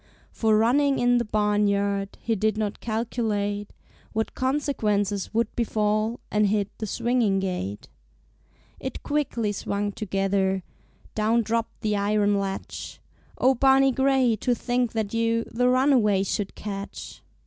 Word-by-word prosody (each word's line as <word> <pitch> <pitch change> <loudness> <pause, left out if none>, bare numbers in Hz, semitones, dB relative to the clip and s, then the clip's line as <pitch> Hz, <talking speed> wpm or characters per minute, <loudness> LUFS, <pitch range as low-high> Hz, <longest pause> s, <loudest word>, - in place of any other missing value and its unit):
For, 220 -2 +2
running 270 +5 +3
in 245 0 +3
the 235 - -1
barnyard, 200 -2 0
He 230 - -1
did 215 +1 0
not 210 -2 -2
calculate 215 -3 -2 0.4
What 220 0 -1
consequences 215 -8 0
would 225 0 -1
befall, 215 0 0
And 210 0 +3
hit 205 0 -1
the 215 - -3
swinging 230 -3 +1
gate. 180 - -4 0.9
It 265 - -6
quickly 265 -8 -1
swung 205 0 -2
together; 195 -2 0 0.5
Down 225 +2 +2
dropped 230 +1 -2
the 210 -2 0
iron 205 0 +2
latch. 195 -1 -5 0.4
Oh, 260 +1 +4
Barney 270 +1 +4
Gray, 265 -2 +3
to 245 +3 0
think 245 -1 -1
that 220 -2 -2
you 230 0 +1
The 250 +2 0
runaway 250 -7 +3
should 195 0 -3
catch! 200 -1 -7
215 Hz, 130 wpm, -25 LUFS, 205-240 Hz, 0.9 s, Oh